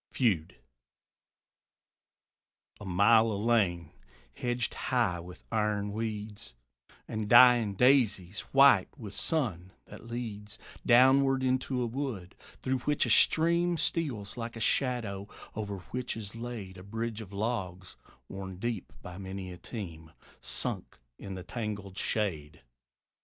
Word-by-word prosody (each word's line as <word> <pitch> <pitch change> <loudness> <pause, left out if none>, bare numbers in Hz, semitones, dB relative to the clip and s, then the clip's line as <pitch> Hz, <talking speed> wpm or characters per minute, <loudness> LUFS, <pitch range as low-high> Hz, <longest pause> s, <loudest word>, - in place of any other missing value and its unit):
FEUD. 100 - 0 2.2
A 105 - -9
mile 110 +5 +4
of 100 - -2
lane, 100 -7 +1 0.4
hedged 120 -1 -2
high 115 -9 0
with 90 +1 -11
iron 105 -2 0
weeds 105 - -5 0.5
And 110 -1 -4
dying 120 -4 +7
daisies, 105 -6 +3
white 135 -8 +6
with 105 -7 -8
sun, 105 - -2
that 115 - -12
leads 110 -3 -6 0.3
Downward 130 +2 +5
into 130 0 0
a - - 0
wood; 115 -7 -4 0.3
through 130 0 0
which 145 +3 +1
a - - 0
stream 170 +2 +4
Steals 130 -14 -2
like 115 0 -5
a - - -6
shadow; 110 -5 0 0.3
over 105 -2 -4
which 125 -2 -3
is 105 -2 -6
laid 115 -6 -7
A - - -11
bridge 115 +2 -4
of 100 -3 -10
logs, 100 -4 -3 0.3
worn 95 -1 -7
deep 115 -1 -4
by 90 +1 -8
many 95 -1 -6
a - - -10
team, 85 -6 -8 0.3
Sunk - - -3 0.2
in 95 -1 -7
the 90 - -7
tangled 105 -4 -5
shade. 80 -8 -2
110 Hz, 125 wpm, -30 LUFS, 95-120 Hz, 2.2 s, dying